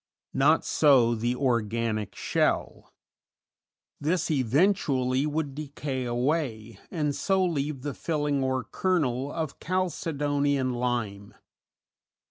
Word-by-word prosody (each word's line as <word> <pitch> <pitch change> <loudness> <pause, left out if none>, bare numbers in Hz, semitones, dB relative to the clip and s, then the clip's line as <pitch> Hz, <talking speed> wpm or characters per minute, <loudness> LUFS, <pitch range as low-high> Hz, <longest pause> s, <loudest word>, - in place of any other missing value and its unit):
Not 150 +4 +3
so 130 -6 +4
the 120 +2 -1
organic 115 -5 -1
shell; - - -1 1.1
this 165 +3 0
eventually 135 - +2
would 150 -2 -2
decay 140 -2 -4
away, 120 -3 -1
and 150 -5 -1
so 190 -1 +2
leave 145 -5 -2
the 145 -1 -3
filling 145 -3 -1
or 130 -1 0
kernel 140 - 0
of 160 -4 -4
chalcedony 145 -5 0
and 130 -2 -1
lime. 115 -5 -3
140 Hz, 100 wpm, -27 LUFS, 125-155 Hz, 1.1 s, so